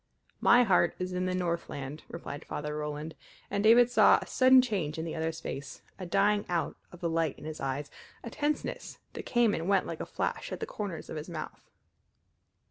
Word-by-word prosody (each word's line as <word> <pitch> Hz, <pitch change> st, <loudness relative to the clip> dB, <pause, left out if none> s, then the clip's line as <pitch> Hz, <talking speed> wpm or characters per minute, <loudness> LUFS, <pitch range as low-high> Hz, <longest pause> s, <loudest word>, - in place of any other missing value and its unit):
"My 245 Hz, +1 st, +6 dB
heart 180 Hz, -5 st, +3 dB
is 180 Hz, 0 st, -4 dB
in 180 Hz, 0 st, -1 dB
the 185 Hz, -, -1 dB
Northland," 170 Hz, -5 st, -3 dB
replied 155 Hz, -3 st, -7 dB
Father 150 Hz, 0 st, -4 dB
Roland, 150 Hz, +1 st, -4 dB, 0.4 s
and 200 Hz, 0 st, 0 dB
David 235 Hz, +2 st, +6 dB
saw -, -, +6 dB
a -, -, -7 dB
sudden 260 Hz, 0 st, +6 dB
change 190 Hz, -11 st, 0 dB
in 160 Hz, -, -3 dB
the 165 Hz, -, -4 dB
other's 160 Hz, 0 st, -2 dB
face, 140 Hz, 0 st, -7 dB, 0.2 s
a 185 Hz, -, -5 dB
dying 205 Hz, +3 st, +3 dB
out 175 Hz, -2 st, -1 dB, 0.2 s
of 175 Hz, -, -13 dB
the 170 Hz, -, 0 dB
light 165 Hz, -3 st, 0 dB
in 150 Hz, -, -11 dB
his 155 Hz, 0 st, -6 dB
eyes, 135 Hz, +1 st, -3 dB, 0.3 s
a 235 Hz, -, -7 dB
tenseness 295 Hz, +4 st, -3 dB, 0.2 s
that -, -, -7 dB
came 240 Hz, -3 st, +3 dB
and 165 Hz, +4 st, -2 dB
went 195 Hz, -2 st, +3 dB
like -, -, -5 dB
a -, -, -5 dB
flash -, -, -3 dB
at -, -, -4 dB
the -, -, -3 dB
corners 200 Hz, -6 st, -6 dB
of 160 Hz, -, -4 dB
his 150 Hz, +3 st, -6 dB
mouth. 155 Hz, -3 st, -7 dB
170 Hz, 205 wpm, -30 LUFS, 155-205 Hz, 0.4 s, My